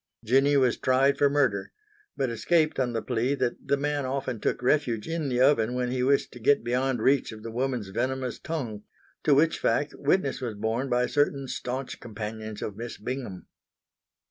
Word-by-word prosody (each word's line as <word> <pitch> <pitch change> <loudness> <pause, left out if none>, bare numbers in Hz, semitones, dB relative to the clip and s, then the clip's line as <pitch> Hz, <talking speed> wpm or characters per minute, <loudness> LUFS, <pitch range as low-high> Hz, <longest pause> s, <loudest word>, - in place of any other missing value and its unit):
Jinny 135 +5 +4
was 130 -3 +3
tried 135 +2 +3
for 145 - +5
murder, 130 -9 +1 0.4
but 130 -3 0
escaped 155 +6 +1
on 125 -2 0
the 115 - -2
plea 125 +3 0
that 125 -3 -2
the 140 - +2
man 145 0 -1
often 130 -2 -3
took - - -1
refuge 125 -5 +1
in 165 -3 -2
the 125 -1 0
oven 125 -3 +3
when 125 -1 -1
he 130 0 -1
wished 140 +2 +2
to 125 - -11
get 140 +3 +3
beyond 125 +2 0
reach 135 -2 +3
of 110 -1 -10
the 115 - -6
woman's 125 -4 -2
venomous 130 +4 -2
tongue, 120 -11 -4 0.4
to 145 - +5
which 155 +3 +3
fact 145 0 +1
witness 140 -2 0
was 120 -4 -3
borne 110 +6 -2
by 125 0 +2
certain 140 -1 0
staunch 130 +1 -4
companions 110 -1 -6
of 105 - -4
Miss 115 +2 -6
Bingham. 120 -5 -5
130 Hz, 185 wpm, -27 LUFS, 115-140 Hz, 0.4 s, for